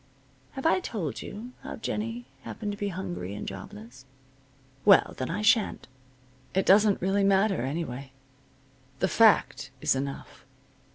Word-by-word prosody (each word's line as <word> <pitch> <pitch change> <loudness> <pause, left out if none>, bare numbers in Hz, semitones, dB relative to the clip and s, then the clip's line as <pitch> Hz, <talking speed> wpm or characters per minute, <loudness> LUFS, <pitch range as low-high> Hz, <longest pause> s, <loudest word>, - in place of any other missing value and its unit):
Have 270 +1 -7
I 325 - +4
told 205 - -4
you 225 +5 -8
how - - -7
Jennie 230 +2 -4 0.2
happened 210 -2 -5
to 205 - -6
be 205 - -1
hungry 175 - -5
and - - -6
jobless? 120 +5 -9 0.8
Well, - - +6
then 130 - -2
I 205 +5 -2
sha'n't. 225 -1 +2 0.7
It 190 - +2
doesn't 205 0 +5
really 195 +2 +2
matter, 195 - +3
anyway. 135 -1 -4 0.9
The 190 - +1
fact 215 -9 +3
is - - +2
enough. 140 +1 -6
195 Hz, 135 wpm, -27 LUFS, 140-215 Hz, 0.9 s, Well